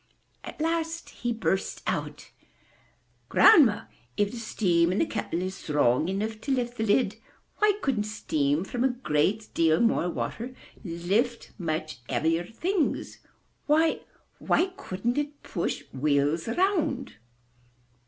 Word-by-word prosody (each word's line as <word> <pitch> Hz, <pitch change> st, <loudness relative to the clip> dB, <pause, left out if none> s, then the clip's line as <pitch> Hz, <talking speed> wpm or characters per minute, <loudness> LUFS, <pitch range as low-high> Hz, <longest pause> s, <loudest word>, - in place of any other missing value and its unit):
At -, -, -9 dB
last 330 Hz, +1 st, -2 dB
he 240 Hz, -, -3 dB
burst 220 Hz, -4 st, -1 dB
out: -, -, -3 dB, 1.0 s
"Grandma, 280 Hz, -, +6 dB, 0.3 s
if 205 Hz, 0 st, +1 dB
the 245 Hz, -, -7 dB
steam 180 Hz, -7 st, +1 dB
in 185 Hz, -, -1 dB
that 325 Hz, -, 0 dB
kettle 170 Hz, +2 st, -2 dB
is 185 Hz, 0 st, -3 dB
strong 150 Hz, -3 st, +1 dB
enough 215 Hz, +3 st, -3 dB
to 275 Hz, -, -3 dB
lift 245 Hz, -2 st, -1 dB
the 220 Hz, -, 0 dB
lid, 210 Hz, -1 st, +2 dB, 0.4 s
why 420 Hz, 0 st, +5 dB
couldn't 235 Hz, -7 st, +1 dB
steam 155 Hz, -8 st, 0 dB
from 240 Hz, +5 st, -2 dB
a -, -, +5 dB
great 215 Hz, -, 0 dB
deal 160 Hz, 0 st, +3 dB
more 225 Hz, -6 st, +2 dB
water 245 Hz, +8 st, -4 dB, 0.3 s
lift 195 Hz, +7 st, -1 dB
much 155 Hz, -4 st, -3 dB
heavier 165 Hz, +2 st, +1 dB
things? 340 Hz, -, -1 dB, 0.5 s
Why 315 Hz, +2 st, +3 dB, 0.2 s
— -, -, -39 dB
why 370 Hz, +2 st, +2 dB
couldn't 235 Hz, -, -2 dB
it 290 Hz, 0 st, -5 dB
push 170 Hz, -, -3 dB
wheels 145 Hz, -, +1 dB
around?" 315 Hz, -, 0 dB
220 Hz, 135 wpm, -27 LUFS, 170-265 Hz, 1.0 s, Grandma